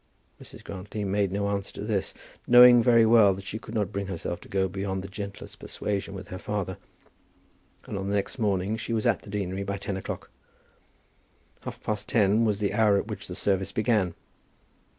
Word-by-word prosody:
Mrs. - - -10
Grantly 100 +2 -6
made 100 -1 0
no 100 +1 -1
answer 100 -1 -2
to - - -6
this, 105 -3 -1 0.3
knowing 120 0 +9
very 115 -1 +5
well 110 -4 +6
that 95 +1 -9
she 110 - -4
could 110 - -9
not 105 -3 0
bring 100 -1 -3
herself 85 -2 -4
to - - -14
go 95 -1 +1
beyond 95 0 -3
the - - -6
gentlest 100 +1 -8
persuasion 100 -1 -3
with 95 - -8
her 95 - -6
father, 95 -3 -3 1.1
and - - -4
on 95 +1 -3
the 100 - 0
next 100 +5 -2
morning 100 0 0
she 115 - -4
was 110 -1 0
at - - +2
the - - -13
deanery 100 -2 -3
by 100 0 -3
ten 100 0 -4
o'clock. 95 - -6 1.3
Half - - -8
past 105 -1 -3
ten 110 0 +3
was 105 -2 +1
the 100 -2 0
hour 105 -2 +4
at 105 - -3
which 100 -2 -6
the 90 - -6
service 95 -1 0
began. 105 -6 +1
100 Hz, 195 wpm, -27 LUFS, 95-105 Hz, 1.3 s, knowing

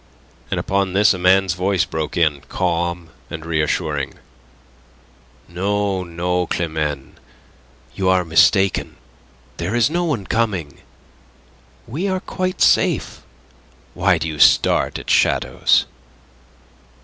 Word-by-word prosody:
And - - -1
upon 95 -1 -1
this 100 +1 +4
a 95 - -6
man's 95 0 +3
voice 90 0 0
broke 80 0 -4
in, 75 -4 +1
calm 85 0 -2 0.2
and 80 -1 -7
reassuring: 75 -3 -1 1.3
"No, 95 +2 -1
no, 90 +1 -2
Climene; 75 -5 -3 0.7
you 95 -1 0
are 90 -1 +2
mistaken. 95 +4 +2 0.6
There 90 +7 -3
is 120 +4 +2
no 175 +1 0
one 145 - -2
coming. 95 - -2 1.1
We 160 - -3
are 190 -1 -1
quite 185 0 -4
safe. - - +2 0.7
Why 90 0 +2
do 80 0 -3
you 80 -2 -6
start - - +4
at - - -10
shadows?" - - +2
90 Hz, 115 wpm, -20 LUFS, 80-100 Hz, 1.3 s, this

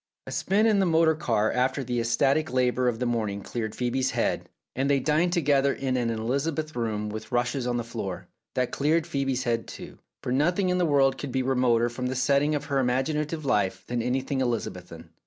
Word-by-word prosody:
A - - -8
spin 205 +3 +1
in 215 -3 +4
the 190 - +3
motor 160 -1 +4
car 115 -8 0
after 130 +2 0
the 120 -1 -2
ecstatic 135 +6 +1
labour 125 0 +1
of 120 -2 0
the 125 - -2
morning 110 -4 -1
cleared 110 -3 -4
Phoebe's 130 +1 0
head, - - -1 0.3
and 135 +2 0
they 140 -1 +3
dined 155 +6 +2
together 140 -5 +3
in 130 -2 -2
an 120 -2 0
Elizabethan 140 +5 -2
room 105 -2 -2
with 110 +2 -7
rushes 120 +1 0
on 120 0 0
the 120 - -2
floor. 110 -5 -6 0.3
That 125 -1 0
cleared 155 +3 +1
Phoebe's 135 -5 -1
head, 115 -2 -1
too, - - -10 0.2
for - - -2
nothing 175 +8 +2
in 180 0 +1
the 175 - +2
world 135 -2 +3
could 140 - -5
be 130 +1 0
remoter 125 -3 +2
from 125 +2 -4
the 130 - -2
setting 140 +3 +2
of 145 - -3
her 140 -2 0
imaginative 150 +5 -1
life 95 -7 0
than 120 -1 -2
anything 130 +3 -1
Elizabethan. 90 -9 -4
130 Hz, 205 wpm, -26 LUFS, 120-145 Hz, 0.3 s, in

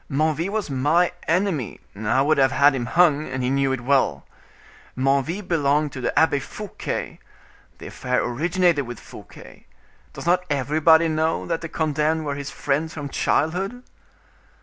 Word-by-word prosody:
Menneville 155 +4 0
was 215 0 -2
my 150 +7 +2 0.2
enemy; 165 - 0 0.2
I 110 +6 +1
would 155 0 +2
have 135 -1 +4
had 145 0 +4
him 120 -3 -3
hung, 155 -1 +3
and 130 0 -3
he 125 - 0
knew 135 0 +1
it 130 -2 -2
well. 125 - +1 0.7
Menneville 140 +9 0
belonged 150 -3 +1
to 130 - -7
the 120 - -2
Abbe 160 -3 +4
Fouquet—the 205 +8 -8
affair 125 -1 -2
originated 165 +2 +1
with 120 - -7
Fouquet; - - -14 0.5
does - - -8
not 180 +1 +2
everybody 155 +4 +3
know 160 0 0
that 165 -1 -2
the 165 - -6
condemned 155 0 0
were 145 - -2
his 140 0 -5
friends 160 +4 -2
from 145 -2 -5
childhood?" 190 - -1
150 Hz, 150 wpm, -23 LUFS, 135-165 Hz, 0.7 s, have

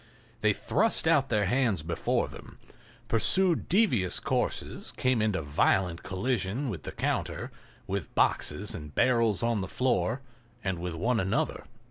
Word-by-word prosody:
They 110 - +4
thrust 195 - +1
out 140 -4 +3
their 105 -3 +2
hands 115 - +1
before 85 +1 0
them, - - -12 0.5
pursued 175 - +2
devious 130 - +2
courses, - - -2
came 130 -3 +2
into 105 -6 0
violent 85 +4 +1
collision 115 +5 -1
with 85 -7 -6
the - - -6
counter, - - -2 0.3
with - - -4
boxes - - +1
and 75 -1 -8
barrels 115 -4 +3
on 115 -3 +1
the 95 - -3
floor, 120 0 0 0.4
and 95 -4 -2
with 90 -1 -4
one 115 +8 +1
another. 95 +1 -1
110 Hz, 140 wpm, -29 LUFS, 95-130 Hz, 0.5 s, They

